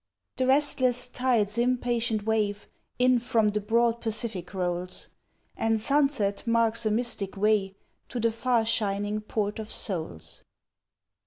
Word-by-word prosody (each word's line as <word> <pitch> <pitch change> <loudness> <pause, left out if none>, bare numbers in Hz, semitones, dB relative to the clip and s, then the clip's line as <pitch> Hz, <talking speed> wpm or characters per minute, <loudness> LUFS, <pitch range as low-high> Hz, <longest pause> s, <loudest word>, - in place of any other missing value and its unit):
The 255 - +1
restless 260 -3 +2
tide's 235 -4 0
impatient 240 -3 0
wave 210 -2 0 0.3
In 250 0 +4
from 225 -2 +2
the 210 0 -2
broad 230 +2 +1
Pacific 215 -5 -1
rolls 180 -1 -3 0.5
And 225 0 +1
sunset 275 -5 +1
marks 230 -1 +2
a - - +2
mystic 215 -3 0
way 200 -1 +1 0.3
To 245 - -4
the 230 0 +2
far 235 0 +1
shining 205 -1 -1
Port 210 0 -2
of 215 0 -6
Souls. 160 - -4
225 Hz, 130 wpm, -27 LUFS, 205-240 Hz, 0.5 s, In